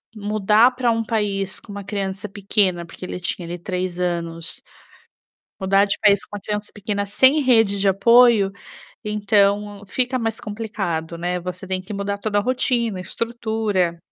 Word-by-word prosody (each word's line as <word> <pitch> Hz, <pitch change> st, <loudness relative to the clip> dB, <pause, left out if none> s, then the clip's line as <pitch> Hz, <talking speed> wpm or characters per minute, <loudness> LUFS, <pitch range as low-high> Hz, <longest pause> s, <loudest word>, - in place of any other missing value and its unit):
mudar 215 Hz, +3 st, +3 dB
pra 250 Hz, -1 st, 0 dB
um 225 Hz, 0 st, 0 dB
país 200 Hz, -4 st, -1 dB
com 210 Hz, -, -13 dB
uma 200 Hz, 0 st, -6 dB
criança 195 Hz, 0 st, -4 dB
pequena, 195 Hz, -3 st, 0 dB
porque 170 Hz, +2 st, -9 dB
ele 180 Hz, -, -5 dB
tinha 175 Hz, 0 st, -4 dB
ali 175 Hz, +1 st, -5 dB
3 180 Hz, -1 st, -3 dB
anos, 170 Hz, -1 st, -3 dB, 1.0 s
mudar 195 Hz, +1 st, +4 dB
de 200 Hz, -, -1 dB
país 205 Hz, -2 st, +4 dB
com 205 Hz, -, -8 dB
uma -, -, -7 dB
criança 210 Hz, 0 st, -4 dB
pequena, 205 Hz, -1 st, -2 dB
sem 265 Hz, +9 st, +4 dB
rede 225 Hz, -6 st, +3 dB
de 200 Hz, -, +3 dB
apoio, 230 Hz, +1 st, +5 dB, 0.5 s
então, 205 Hz, -1 st, +1 dB
fica 255 Hz, +5 st, 0 dB
mais 225 Hz, 0 st, -2 dB
complicado, 195 Hz, -7 st, -4 dB
né, 180 Hz, +1 st, -1 dB
você 180 Hz, +1 st, -6 dB
tem 185 Hz, 0 st, -2 dB
que 195 Hz, +3 st, -9 dB
mudar 200 Hz, 0 st, -2 dB
toda 205 Hz, 0 st, 0 dB
a -, -, +1 dB
rotina, 240 Hz, -4 st, 0 dB
a -, -, -5 dB
estrutura 220 Hz, -6 st, -1 dB
205 Hz, 165 wpm, -22 LUFS, 185-220 Hz, 1.0 s, apoio